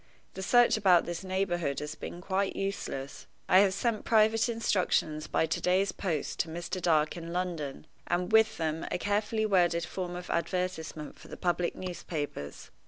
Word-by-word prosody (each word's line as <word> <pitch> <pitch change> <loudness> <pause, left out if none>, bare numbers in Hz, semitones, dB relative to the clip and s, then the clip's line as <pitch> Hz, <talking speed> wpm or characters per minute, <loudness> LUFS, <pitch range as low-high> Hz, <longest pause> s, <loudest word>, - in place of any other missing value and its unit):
The 190 - -6
search 240 +4 +5
about 185 -5 +5
this 175 +2 -4
neighborhood 180 -6 -1
has 150 +1 -5
been 175 +2 -8
quite 195 +1 -1
useless. 180 -8 -4 0.2
I 185 - +7
have 200 -1 +5
sent 215 +3 -1
private 220 +1 +3
instructions 180 -8 0
by - - +1
to 160 - -2
day's 190 +2 +2
post 165 -7 -3
to - - +1
Mr. 175 +3 -4
Dark 155 -3 +2
in 170 0 -7
London, 170 -6 -3 0.2
and 180 +2 0
with 220 0 +5
them 160 -1 -2
a - - -1
carefully 210 +3 0
worded 175 -4 +2
form 180 -1 -5
of 180 - -6
advertisement 170 -3 -3
for - - -13
the - - -9
public 175 -1 0
newspapers. 155 - -5
180 Hz, 170 wpm, -30 LUFS, 165-195 Hz, 0.2 s, I